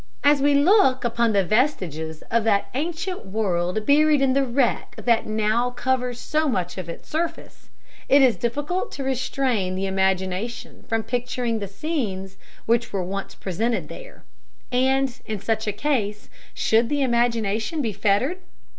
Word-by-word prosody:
As 285 Hz, -1 st, +4 dB
we 285 Hz, 0 st, +4 dB
look 285 Hz, -3 st, +4 dB
upon 235 Hz, -1 st, +1 dB
the 200 Hz, -2 st, +3 dB
vestiges 175 Hz, -, -1 dB
of 230 Hz, -1 st, +2 dB
that 200 Hz, -3 st, +1 dB
ancient 340 Hz, +6 st, -3 dB
world 190 Hz, -1 st, -1 dB
buried 300 Hz, +1 st, +4 dB
in 270 Hz, -1 st, +3 dB
the 275 Hz, +1 st, +3 dB
wreck 250 Hz, -1 st, 0 dB
that 235 Hz, -2 st, +1 dB
now 215 Hz, +3 st, +1 dB
covers 245 Hz, 0 st, -1 dB
so 310 Hz, -1 st, 0 dB
much 180 Hz, -8 st, -2 dB
of 175 Hz, -2 st, -6 dB
its 170 Hz, -, -8 dB
surface, 330 Hz, +2 st, -4 dB, 0.4 s
it 275 Hz, 0 st, +6 dB
is 250 Hz, -3 st, +5 dB
difficult 290 Hz, +10 st, -2 dB
to 275 Hz, -, -4 dB
restrain 255 Hz, -7 st, -1 dB
the 190 Hz, +1 st, -2 dB
imagination 190 Hz, +3 st, -2 dB
from 225 Hz, 0 st, 0 dB
picturing 245 Hz, -1 st, -2 dB
the 200 Hz, -, -4 dB
scenes 195 Hz, -, -4 dB, 0.3 s
which 235 Hz, +1 st, +1 dB
were 195 Hz, -2 st, -1 dB
once 195 Hz, +2 st, -5 dB
presented 225 Hz, +6 st, -2 dB
there; -, -, -11 dB, 0.5 s
and, 265 Hz, 0 st, +1 dB
in 215 Hz, -2 st, -3 dB
such 220 Hz, +1 st, -1 dB
a -, -, +2 dB
case, 210 Hz, -3 st, -2 dB, 0.2 s
should 230 Hz, +1 st, +2 dB
the 290 Hz, -1 st, +1 dB
imagination 235 Hz, +1 st, 0 dB
be 230 Hz, -7 st, -1 dB
fettered? 210 Hz, -, +1 dB
235 Hz, 155 wpm, -23 LUFS, 200-275 Hz, 0.5 s, it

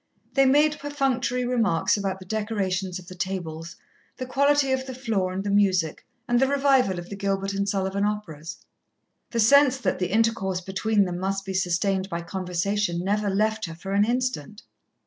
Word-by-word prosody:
They 270 Hz, +1 st, +4 dB
made 295 Hz, +2 st, +3 dB
perfunctory 260 Hz, -4 st, -1 dB
remarks 225 Hz, -9 st, +2 dB
about 195 Hz, -2 st, -2 dB
the 190 Hz, -, -12 dB
decorations 195 Hz, -3 st, -2 dB
of 185 Hz, -, -11 dB
the 185 Hz, -, -10 dB
tables, 175 Hz, -3 st, -5 dB, 0.4 s
the 255 Hz, -, -4 dB
quality 280 Hz, +1 st, +2 dB
of 260 Hz, 0 st, -1 dB
the 260 Hz, -, -6 dB
floor 220 Hz, -8 st, -1 dB
and 190 Hz, +1 st, -3 dB
the 200 Hz, -, -2 dB
music, 185 Hz, -6 st, +1 dB, 0.2 s
and 240 Hz, 0 st, +3 dB
the 265 Hz, -, +3 dB
revival 270 Hz, -8 st, +3 dB
of 175 Hz, 0 st, -6 dB
the -, -, -4 dB
Gilbert 195 Hz, 0 st, -1 dB
and 200 Hz, 0 st, -1 dB
Sullivan 195 Hz, 0 st, -1 dB
operas. 190 Hz, -7 st, -4 dB, 0.7 s
The 235 Hz, -, -2 dB
sense 270 Hz, +4 st, +5 dB
that 260 Hz, -, -1 dB
the 180 Hz, -1 st, -1 dB
intercourse 215 Hz, -4 st, +1 dB
between 200 Hz, +3 st, +1 dB
them 175 Hz, -1 st, -4 dB
must 195 Hz, +1 st, -2 dB
be 190 Hz, -, -4 dB
sustained 190 Hz, +1 st, 0 dB
by 170 Hz, -2 st, -3 dB
conversation 180 Hz, 0 st, -2 dB
never 205 Hz, +2 st, 0 dB
left 215 Hz, +2 st, 0 dB
her 165 Hz, -1 st, -7 dB
for 190 Hz, +4 st, -7 dB
an 200 Hz, +1 st, +3 dB
instant. 240 Hz, -, -2 dB
200 Hz, 180 wpm, -25 LUFS, 185-245 Hz, 0.7 s, sense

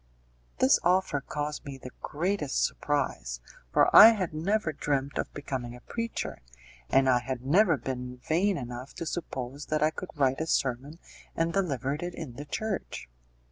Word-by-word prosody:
This 130 Hz, -, +5 dB
offer 180 Hz, -5 st, +2 dB
caused 150 Hz, +2 st, -4 dB
me 140 Hz, -1 st, -7 dB
the 125 Hz, -1 st, -10 dB
greatest 155 Hz, -2 st, 0 dB
surprise, -, -, -2 dB, 0.3 s
for -, -, +4 dB
I 225 Hz, +2 st, +11 dB
had 185 Hz, -7 st, -3 dB
never 170 Hz, +2 st, 0 dB
dreamt 140 Hz, -1 st, -1 dB
of -, -, -3 dB
becoming 130 Hz, -4 st, -5 dB
a 125 Hz, -, -13 dB
preacher, 230 Hz, -, -4 dB, 0.5 s
and 135 Hz, 0 st, +4 dB
I 125 Hz, -1 st, +5 dB
had 125 Hz, +1 st, -5 dB
never 170 Hz, +2 st, +4 dB
been 125 Hz, -1 st, -5 dB
vain 175 Hz, +9 st, +1 dB
enough 125 Hz, 0 st, -7 dB
to 165 Hz, -, -5 dB
suppose 140 Hz, -4 st, -5 dB
that 155 Hz, 0 st, +1 dB
I 155 Hz, -, +3 dB
could 180 Hz, -, -7 dB
write 135 Hz, -1 st, +1 dB
a 160 Hz, -, -2 dB
sermon 135 Hz, +2 st, -1 dB, 0.4 s
and 165 Hz, 0 st, 0 dB
deliver 140 Hz, -9 st, 0 dB
it 175 Hz, +4 st, -5 dB
in 155 Hz, -7 st, -7 dB
the 145 Hz, +5 st, -8 dB
church. 195 Hz, -, -4 dB
145 Hz, 165 wpm, -28 LUFS, 130-170 Hz, 0.5 s, I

